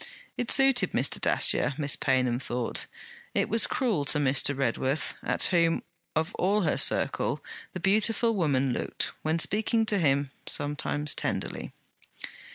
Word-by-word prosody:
It 245 Hz, -, -4 dB
suited 270 Hz, -2 st, +4 dB
Mr. -, -, +1 dB
Dacier, 140 Hz, -, +3 dB
Miss 145 Hz, -2 st, +1 dB
Paynham 130 Hz, -3 st, 0 dB
thought: 125 Hz, -2 st, -3 dB, 0.5 s
it -, -, 0 dB
was 225 Hz, +2 st, +4 dB
cruel 225 Hz, -, -1 dB
to 150 Hz, -, +1 dB
Mr. 140 Hz, 0 st, +2 dB
Redworth; 135 Hz, +3 st, -1 dB
at -, -, 0 dB
whom, 170 Hz, -2 st, +2 dB, 0.3 s
of 160 Hz, +2 st, -1 dB
all 200 Hz, +3 st, +1 dB
her 160 Hz, -, 0 dB
circle, -, -, 0 dB, 0.3 s
the 185 Hz, -, -5 dB
beautiful 220 Hz, +4 st, +2 dB
woman 140 Hz, -, 0 dB
looked, -, -, -2 dB
when 155 Hz, +1 st, -1 dB
speaking 220 Hz, +6 st, +1 dB
to 210 Hz, -2 st, +1 dB
him, 140 Hz, -3 st, +1 dB, 0.2 s
sometimes 145 Hz, 0 st, -1 dB
tenderly. -, -, -4 dB
155 Hz, 140 wpm, -27 LUFS, 140-210 Hz, 0.5 s, suited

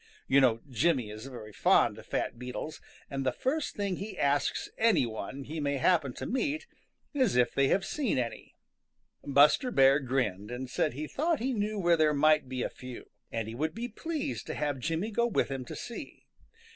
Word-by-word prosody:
You 140 Hz, +1 st, +5 dB
know 115 Hz, -3 st, +3 dB
Jimmy 130 Hz, -3 st, +1 dB
is 110 Hz, +4 st, -8 dB
very 110 Hz, -5 st, -9 dB
fond -, -, +3 dB
of -, -, -14 dB
fat 120 Hz, -, -2 dB
beetles, 125 Hz, +5 st, -6 dB, 0.3 s
and 135 Hz, -1 st, -3 dB
the 130 Hz, -, +2 dB
first 285 Hz, -, -2 dB
thing 200 Hz, -3 st, -1 dB
he 205 Hz, +3 st, -6 dB
asks 140 Hz, 0 st, +1 dB
any 225 Hz, -, +3 dB
one 115 Hz, +4 st, -5 dB
he 155 Hz, +4 st, -5 dB
may 140 Hz, -1 st, 0 dB
happen 150 Hz, -1 st, +3 dB
to -, -, -6 dB
meet 285 Hz, -, -1 dB, 0.5 s
is 260 Hz, -, +2 dB
if 125 Hz, -1 st, +3 dB
they 140 Hz, 0 st, +3 dB
have 195 Hz, +7 st, +2 dB
seen 265 Hz, -, -1 dB
any. 120 Hz, -2 st, -4 dB, 0.7 s
Buster 145 Hz, -, +5 dB
Bear 135 Hz, -, +5 dB
grinned 120 Hz, -7 st, -1 dB
and 125 Hz, +1 st, -5 dB
said -, -, +1 dB
he 150 Hz, +4 st, -4 dB
thought 315 Hz, -, 0 dB
he 260 Hz, +3 st, -1 dB
knew 210 Hz, -1 st, -1 dB
where 175 Hz, -3 st, +3 dB
there 155 Hz, -1 st, +3 dB
might 155 Hz, -2 st, +4 dB
be 130 Hz, -1 st, -2 dB
a -, -, -1 dB
few, 125 Hz, -1 st, -10 dB, 0.2 s
and 115 Hz, -1 st, -2 dB
he 110 Hz, -, -6 dB
would 155 Hz, +7 st, -2 dB
be 235 Hz, +1 st, -3 dB
pleased 305 Hz, +4 st, -4 dB
to -, -, -4 dB
have 145 Hz, -3 st, -1 dB
Jimmy 165 Hz, -, -2 dB
go 235 Hz, +3 st, +2 dB
with 215 Hz, -, 0 dB
him 135 Hz, -2 st, -4 dB
to -, -, -7 dB
see. 245 Hz, +4 st, -8 dB
145 Hz, 200 wpm, -30 LUFS, 125-210 Hz, 0.7 s, You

